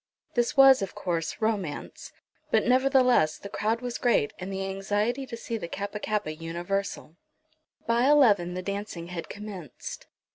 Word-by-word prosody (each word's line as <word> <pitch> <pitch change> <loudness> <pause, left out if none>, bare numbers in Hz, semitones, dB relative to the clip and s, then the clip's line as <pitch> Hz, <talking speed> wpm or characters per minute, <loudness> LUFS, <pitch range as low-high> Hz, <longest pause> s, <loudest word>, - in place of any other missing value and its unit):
This 240 +2 0
was, 270 -2 +8
of 195 - -4
course, 165 -3 -2
romance; 205 -9 -3 0.4
but, - - +3
nevertheless, 255 - +4
the 200 - -9
crowd 220 +3 -1
was 245 -1 -4
great, 235 - +2
and 185 +2 -5
the 195 0 -3
anxiety 205 +7 -1
to 230 - -6
see 230 0 -4
the 170 - -5
Kappa 200 +4 -5
kappa 210 -7 -2
universal. 170 +1 -4 0.7
By 235 +3 +3
eleven 205 -12 +4
the 185 - -4
dancing 200 -3 -5
had 175 -2 -6
commenced. 200 - -8
205 Hz, 150 wpm, -27 LUFS, 180-235 Hz, 0.7 s, was